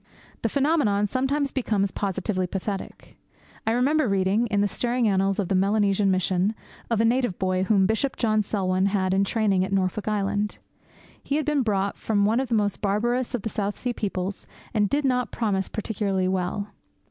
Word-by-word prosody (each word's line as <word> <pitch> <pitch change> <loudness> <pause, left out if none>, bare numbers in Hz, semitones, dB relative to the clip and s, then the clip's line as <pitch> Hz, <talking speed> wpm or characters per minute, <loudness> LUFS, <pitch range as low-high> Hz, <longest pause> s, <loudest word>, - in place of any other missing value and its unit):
The 225 - 0
phenomenon 270 -7 +2
sometimes 270 +5 0
becomes 210 -7 0
positively 190 -1 -2
pathetic. 195 +1 -6 0.5
I - - +3
remember 260 +3 +2
reading, 195 +4 +2
in 205 -2 +1
the 205 - +3
stirring 240 +3 0
annals 195 -1 +1
of 200 - -1
the 195 - -1
Melanesian 200 +1 +2
Mission, 185 +2 +1 0.3
of 230 -2 +2
a - - +3
native 245 -4 +1
boy 185 0 0
whom 195 -2 +3
Bishop 225 +6 0
John 215 -2 +2
Selwyn 190 -2 0
had 190 -2 0
in 195 +1 +3
training 200 -3 +1
at 190 - -4
Norfolk 195 +2 0
Island. 205 0 -1 0.6
He 280 - -2
had 305 -1 0
been 300 -2 +2
brought 200 -4 0
from 205 -2 +1
one 225 +4 +2
of 265 - -1
the 235 - 0
most 205 -2 0
barbarous 240 +5 0
of 225 - -5
the 220 - -2
South 205 -1 -2
Sea 245 -1 -2
peoples, 195 -3 -3 0.3
and 210 -3 +2
did 290 0 0
not 250 -3 +1
promise 200 -5 -1
particularly 200 -3 -1
well. 190 +2 -2
205 Hz, 180 wpm, -25 LUFS, 195-235 Hz, 0.6 s, I